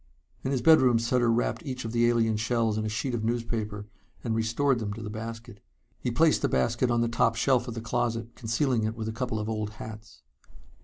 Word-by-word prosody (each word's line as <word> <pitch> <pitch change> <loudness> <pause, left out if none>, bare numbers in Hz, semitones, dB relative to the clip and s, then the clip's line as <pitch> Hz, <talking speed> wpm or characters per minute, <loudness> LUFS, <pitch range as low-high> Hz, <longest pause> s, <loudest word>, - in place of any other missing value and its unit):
In - - -1
his 130 -3 -1
bedroom 130 -7 +6
Sutter 120 +1 +2
wrapped 120 +1 0
each 130 -5 -5
of 115 - -3
the 120 0 +3
alien 115 -2 +2
shells 115 0 0
in 110 - -1
a 110 - -2
sheet 115 +4 -2
of 115 -2 -2
newspaper 115 -3 -2 0.4
and 115 - -1
restored 115 +4 +1
them 105 -2 -3
to 115 - -7
the 105 - -5
basket. 115 -1 -7 0.4
He - - -2
placed - - +3
the - - +1
basket 115 - +1
on 120 -1 +2
the 120 - +2
top 115 0 +2
shelf 125 +1 +2
of 115 - -5
the 115 - -4
closet, 115 0 -2
concealing 115 +1 0
it 110 +1 -1
with 110 -1 -4
a - - -2
couple 120 -1 -2
of 105 - -3
old 110 -1 -3
hats. 110 - -10
115 Hz, 220 wpm, -28 LUFS, 110-120 Hz, 0.4 s, bedroom